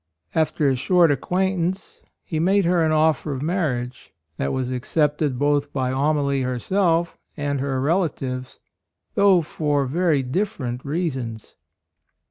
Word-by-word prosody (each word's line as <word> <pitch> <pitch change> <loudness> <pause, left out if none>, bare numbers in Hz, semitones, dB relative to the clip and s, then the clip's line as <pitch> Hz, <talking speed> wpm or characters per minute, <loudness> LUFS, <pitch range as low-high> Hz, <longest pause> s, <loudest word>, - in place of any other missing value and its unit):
After 155 -2 +1
a 135 - +3
short 170 +5 +3
acquaintance 185 +5 -1 0.2
he 160 - -3
made 190 +3 +3
her 175 0 +3
an 160 - +2
offer 155 -1 +2
of 135 +1 -4
mar 170 -2 0
riage, 125 +1 -7 0.3
that 70 - -1
was 130 -1 -2
accepted 145 +1 0
both 145 +1 +1
by 130 -2 -1
Amalie 140 0 +1
herself 165 - 0 0.2
and 145 -2 -1
her 135 -1 -1
rela 165 +6 +2
tives, 130 -1 -6 0.6
though 195 -4 +4
for 145 -2 -1
very 155 0 +1
different 130 - -3
reasons. 135 -8 -3
150 Hz, 135 wpm, -23 LUFS, 130-170 Hz, 0.6 s, though